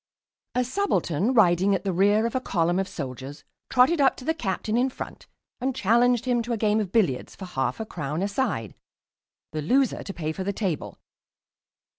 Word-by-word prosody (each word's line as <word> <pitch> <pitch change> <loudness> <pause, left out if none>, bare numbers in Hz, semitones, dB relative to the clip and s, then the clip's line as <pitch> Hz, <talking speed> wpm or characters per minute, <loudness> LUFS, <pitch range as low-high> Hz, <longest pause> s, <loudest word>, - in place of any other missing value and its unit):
"A 250 - +3
subaltern 245 - 0
riding 195 -2 +4
at 185 - -3
the 195 -2 -1
rear 205 +5 +3
of 235 - -2
a 260 - 0
column 175 -4 +1
of 195 - -1
soldiers 135 -2 -7 0.3
trotted 265 +5 +4
up 265 -2 +4
to 255 - -10
the 320 - +2
captain 215 - -2
in 250 +2 +2
front - - -8 0.3
and 260 +1 -1
challenged 240 +1 +3
him 245 -2 +2
to 240 +1 -3
a - - -1
game 215 0 +2
of 200 -4 -3
billiards 180 - +1
for 190 - -8
half 130 -8 -2
a 220 - -3
crown 155 -2 -3
a - - +1
side, 200 - -2 0.8
the 155 - -3
loser 255 - +2
to - - -6
pay 155 -4 -3
for 190 +4 -4
the 200 +1 -2
table. 190 -8 -3
205 Hz, 195 wpm, -25 LUFS, 175-245 Hz, 0.8 s, riding